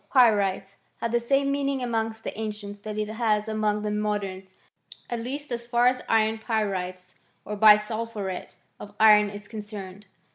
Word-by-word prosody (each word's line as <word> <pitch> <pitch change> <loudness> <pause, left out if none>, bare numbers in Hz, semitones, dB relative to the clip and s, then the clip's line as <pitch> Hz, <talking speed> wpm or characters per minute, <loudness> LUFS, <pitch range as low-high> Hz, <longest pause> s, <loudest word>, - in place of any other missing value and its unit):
Pyrites 200 -6 +3 0.2
had 230 - -2
the 240 - +2
same 275 +3 +1
meaning 275 -2 -1
among 225 -2 -1
the - - -5
an 220 0 -3
cients 205 -1 -8
that 215 0 -6
it 215 0 -1
has 215 -1 0
among 215 -1 0
the 210 - -1
moderns; 200 -3 -3 0.6
at 240 - -1
least 270 +4 -5
as 235 0 -4
far 240 0 +2
as 250 0 +3
iron 220 0 +2
pyrites 185 -5 -3 0.3
or 210 - -4
bisulphuret 210 -2 +2 0.2
of 205 0 -10
iron 210 -1 +7
is 205 0 -9
concerned. 205 -2 -8
215 Hz, 160 wpm, -26 LUFS, 205-230 Hz, 0.6 s, iron